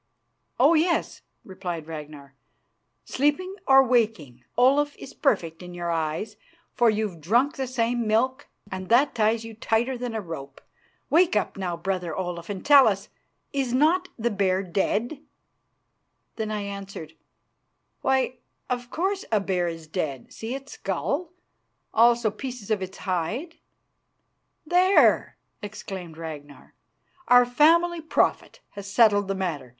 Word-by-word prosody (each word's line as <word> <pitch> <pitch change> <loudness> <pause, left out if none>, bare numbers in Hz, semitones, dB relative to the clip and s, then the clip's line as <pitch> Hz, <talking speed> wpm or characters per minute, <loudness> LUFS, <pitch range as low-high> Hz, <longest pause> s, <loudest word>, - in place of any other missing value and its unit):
"Oh - - +6
yes," 335 +2 +1 0.2
replied 180 -4 -6
Ragnar. 150 -3 -9 0.7
"Sleeping 295 +8 0
or 270 0 +7
waking, 220 - 0
Olaf 280 +4 +3
is 270 - -10
perfect 170 - 0
in 180 0 -9
your 175 -1 -3
eyes, 160 +5 -2 0.4
for 240 -2 +4
you've 210 -6 -2
drunk 240 - +2
the 265 -2 -3
same 240 -2 -1
milk, 255 +6 +1 0.2
and 185 -1 -6
that 265 +5 +4
ties 225 0 +1
you 225 - -8
tighter 235 +3 -1
than 245 -2 -4
a - - -1
rope. 140 -6 -8 0.5
Wake 340 -4 +4
up, 210 - 0
now, 180 -3 -3
brother 180 -2 -3
Olaf, 175 -2 -4
and 195 -2 -5
tell 285 -2 +8
us: 200 -1 -1 0.4
Is 270 -3 -1
not 335 +7 +3
the 235 0 -1
bear 195 -2 +1
dead?" 215 - -1 1.1
Then 220 -1 -3
I 210 -1 -2
answered, 200 -5 -7 0.9
"Why, 260 -1 +1 0.3
of 245 -1 -3
course, 380 +6 -1
a 215 - +3
bear 185 -3 -1
is 165 -1 -6
dead; 155 -6 -4
see 225 +3 -5
its 275 +1 -9
skull, 315 +4 -3 0.6
also 235 -1 +4
pieces 240 -1 -7
of 210 -3 +1
its 190 0 -6
hide?" 215 - -3 1.1
"There!" 365 +4 +4 0.2
exclaimed 190 -5 -7
Ragnar. 150 -3 -9 0.5
"Our 245 0 +7
family 330 +7 +3
prophet 320 - 0
has 200 -1 -8
settled 205 -2 +4
the 195 - -1
matter. 165 -9 -3
215 Hz, 135 wpm, -25 LUFS, 180-260 Hz, 1.1 s, tell